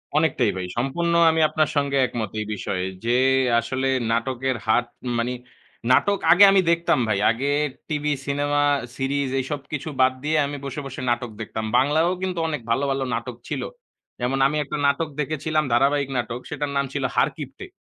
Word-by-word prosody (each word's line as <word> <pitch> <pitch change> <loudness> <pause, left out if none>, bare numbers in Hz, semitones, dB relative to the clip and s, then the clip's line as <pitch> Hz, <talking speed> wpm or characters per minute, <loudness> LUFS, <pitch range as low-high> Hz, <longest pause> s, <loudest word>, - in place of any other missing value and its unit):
অনেকটাই 130 -8 +2
ভাই। 90 - -3
সম্পূর্ণ 170 +7 0 0.2
আমি 160 0 +1
আপনার 155 -2 +1
সঙ্গে 140 -1 +1
একমত 115 -5 -4
এই 105 - -2
বিষয়ে। 95 -2 -3 0.2
যে 120 +1 +3 0.4
আসলে 130 +3 -2 0.2
নাটকের 130 +2 -1
হার 110 +2 +3 0.4
মানি 120 +2 -1 0.6
নাটক 200 +10 +3
আগে 180 +4 +8
আমি 195 -1 +5
দেখতাম 170 -4 +2
ভাই। 105 -2 +1
আগে 130 +5 -2 0.4
টিভি, 150 -1 -1
সিনেমা, 145 +1 0 0.3
সিরিজ 140 0 -1
এইসব 140 +2 -3
কিছু 150 +2 -3
বাদ 130 0 +5
দিয়ে 155 +1 +1
আমি 145 +1 -5
বসে, 140 +1 -5
বসে 135 -1 -7
নাটক 120 -1 -2
দেখতাম। 110 0 -4
বাংলায়ও 155 +7 +3
কিন্তু 185 -2 -2
অনেক 150 -5 -3
ভালো, 125 +4 +1
ভালো 135 0 -1
নাটক 120 +1 -5
ছিল। - - -3 0.6
যেমন 125 +2 -1
আমি 150 +2 -2
একটা 150 +1 -5
নাটক 150 +3 0
দেখেছিলাম। 155 +1 0
ধারাবাহিক 140 +3 +2
নাটক। 120 0 -3
সেটার 145 -1 -3
নাম 140 - +1
ছিল 140 - -2
'হারকিপটে।' - - -2
140 Hz, 170 wpm, -23 LUFS, 125-150 Hz, 0.6 s, আগে